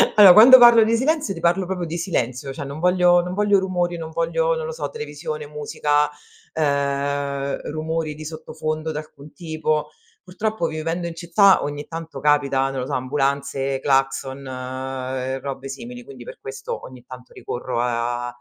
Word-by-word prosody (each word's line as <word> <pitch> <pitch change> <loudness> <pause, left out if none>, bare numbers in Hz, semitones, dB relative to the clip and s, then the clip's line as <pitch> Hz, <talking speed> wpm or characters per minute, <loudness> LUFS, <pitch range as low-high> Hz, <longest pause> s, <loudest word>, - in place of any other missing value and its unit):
allo 200 -4 +10
quando 245 +6 +10
parlo 235 -2 +8
di 225 +1 +2
silenzio 300 -2 0
ti 165 - -7
parlo 175 +3 +1
proprio 180 -2 -3
di 165 0 -5
silenzio, 135 -6 -2
cioè 140 +2 -6
non 140 +2 -7
voglio 180 0 +4
non 180 +1 -5
voglio 205 -1 +3
rumori, 175 -2 -1
non 160 -1 -6
voglio, - - 0
non 485 -1 -4
lo 475 - -4
so, 480 - -4
televisione, 460 0 -6
musica, 150 - 0 0.4
ehm, 140 -1 -1
rumori 155 0 -3
di 155 +1 -9
sottofondo 155 0 -4
d'alcun 150 -1 -9
tipo. 155 -3 -2 0.3
Purtroppo 215 0 -3
vivendo 165 +2 -3
in 170 - -6
città 185 +3 +4
ogni 145 0 -4
tanto 165 -1 -7
capita, 140 -2 +2
non 135 - -4
lo - - -3
so, 145 - -5
ambulanze, 135 0 -1
clacson, 135 0 0
uhm, 130 0 -5
robe 135 0 -6
simili, 125 -2 -8
quindi 130 -1 -12
per - - -11
questo 135 0 -6
ogni 125 -1 -12
tanto 125 -1 -12
ricorro 125 -1 -4
a 120 0 -1
150 Hz, 165 wpm, -22 LUFS, 135-180 Hz, 0.4 s, allo